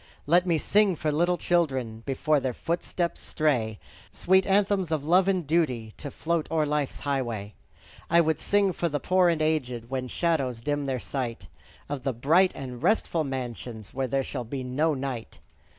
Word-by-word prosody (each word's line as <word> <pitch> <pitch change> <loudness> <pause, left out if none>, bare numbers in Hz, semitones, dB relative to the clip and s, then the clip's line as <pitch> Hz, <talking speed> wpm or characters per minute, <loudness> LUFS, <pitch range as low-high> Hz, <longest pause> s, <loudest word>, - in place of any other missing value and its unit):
Let 175 +4 +4
me 170 -2 +3
sing 200 +3 +3
for 155 0 -1
little 175 +4 +2
children, 130 -12 0
Before 150 +3 +2
their 130 -3 -3
footsteps 170 +1 -2
stray, 120 -9 0 0.3
Sweet 190 +1 +2
anthems 195 -3 +2
of 150 -3 -1
love 180 +4 +4
and 185 -4 +1
duty, 135 -8 0
To 145 - -6
float 165 +2 -2
o'er 160 -1 +1
life's 150 -2 -2
highway. 120 -7 -2 0.6
I 170 - +5
would 160 -2 +2
sing 200 -2 +2
for 170 - -1
the 145 -1 -1
poor 185 +1 +3
and 160 -2 +1
aged, 125 -6 -1
When 130 -1 -2
shadows 135 -6 0
dim 145 0 -1
their 130 -2 -1
sight; 120 -2 -4 0.4
Of 145 -2 -4
the 135 +1 -1
bright 165 +10 +4
and 125 -2 -7
restful 175 -7 +1
mansions, 120 -5 -6
Where 135 0 -1
there 135 +2 0
shall 130 -1 -4
be 130 +3 -5
no 145 +5 +1
night. 130 -4 -5
145 Hz, 175 wpm, -27 LUFS, 130-170 Hz, 0.6 s, I